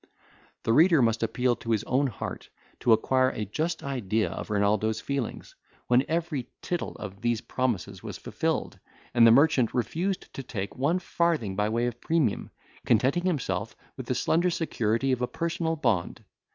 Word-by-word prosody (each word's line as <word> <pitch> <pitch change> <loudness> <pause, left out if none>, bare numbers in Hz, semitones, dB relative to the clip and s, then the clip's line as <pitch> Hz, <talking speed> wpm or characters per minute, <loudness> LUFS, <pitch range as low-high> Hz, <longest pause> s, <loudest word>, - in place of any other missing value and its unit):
The 115 - +2
reader 165 +3 +6
must 115 -2 +2
appeal 120 +2 +1
to 115 - -8
his 110 -3 +1
own 135 +2 +1
heart, 115 - -6 0.3
to 120 - +2
acquire 130 +4 +4
a 110 - -4
just 160 - -2
idea 110 -8 -1
of - - -6
Renaldo's 105 +1 +1
feelings, 135 +1 -4 0.3
when 125 +1 +4
every 160 -6 -2
tittle 175 -1 -3
of 100 -1 -8
these 120 -1 +1
promises 100 -8 -2
was - - -6
fulfilled, - - -2 0.3
and 115 -1 +7
the - - +8
merchant 130 -2 +4
refused 175 - -2
to - - -5
take 100 -6 -5
one 145 +7 +1
farthing 170 - 0
by 105 +2 +1
way 115 +2 0
of 120 -1 -4
premium, 155 -10 0 0.3
contenting 155 +7 +2
himself 155 -8 -2 0.2
with - - -8
the - - 0
slender 175 +3 +2
security 130 -7 0
of 125 -1 0
a 125 - +1
personal 165 +1 -2
bond. 100 - -1
125 Hz, 165 wpm, -27 LUFS, 110-155 Hz, 0.3 s, the